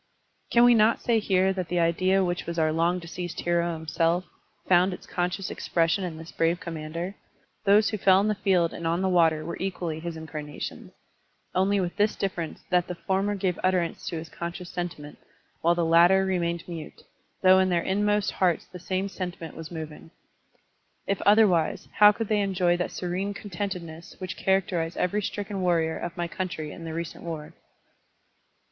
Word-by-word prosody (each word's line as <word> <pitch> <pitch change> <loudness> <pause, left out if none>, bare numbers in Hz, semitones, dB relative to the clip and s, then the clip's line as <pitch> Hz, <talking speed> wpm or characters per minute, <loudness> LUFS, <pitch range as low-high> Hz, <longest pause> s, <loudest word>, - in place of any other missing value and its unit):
"* - - -44
Can 235 - +6
we 245 0 +7
not 225 0 +4
say 235 -2 +2
here 190 -2 +2
that 185 -3 -3
the 175 0 0
idea 185 +3 +2
which 175 0 -3
was 170 0 -4
our 155 -1 +2
long 170 +3 +1
deceased 175 0 -6
hero 170 0 +1
himself, 165 +2 0 0.4
fotmd 180 +1 +4
its - - -10
conscious 180 +1 -2
expression 165 +3 0
in 170 -3 -4
this 165 +1 -10
brave 165 +1 +1
Commander? 165 +2 -5 0.5
Those 210 +2 +5
who 215 - -3
fell 190 0 +5
in 205 - +1
the 215 - +2
field 185 -5 +1
and 165 - -4
on 170 +3 0
the - - +2
water 165 -3 +3
were 170 - -5
equally 175 -4 -3
his 170 0 -5
incarnations, 150 -2 -7 0.6
only 195 +2 +2
with 180 0 -3
this 210 +1 +2
difference 175 -5 -4
that 180 -1 +3
the 180 - -4
former 195 +3 0
gave 185 -3 -1
utterance 185 -2 0
to - - -3
his 160 +1 -6
conscious 175 +1 -6
sentiment, 175 -4 -6 0.4
while 170 +1 +3
the 170 -1 +1
latter 175 +4 +5
remained 170 -3 -1
mute, 165 -3 -8 0.4
though 185 0 +7
in 190 0 +3
their 175 -1 +1
inmost 205 +1 +1
hearts 180 -4 +1
the 180 - -11
same 185 +2 -2
sentiment 180 -4 -6
was 160 -1 -8
moving. 160 -2 -8 1.0
If 200 - -1
otherwise, 205 -6 +4
how 210 0 +9
cotdd 225 +1 -4
they 210 -1 +2
enjoy 180 -3 +2
that 180 - -2
serene 185 +3 -3
contentedness 175 -5 -6
which 185 -1 -5
characterized 180 -3 0
every 205 +4 0
stricken 205 0 -4
warrior 165 -3 +1
of 175 - -5
my 175 0 -1
country 170 -4 -4
in 165 - -9
the 160 - -5
recent 165 0 -5
war? 160 -3 -6
175 Hz, 180 wpm, -26 LUFS, 165-190 Hz, 1.0 s, how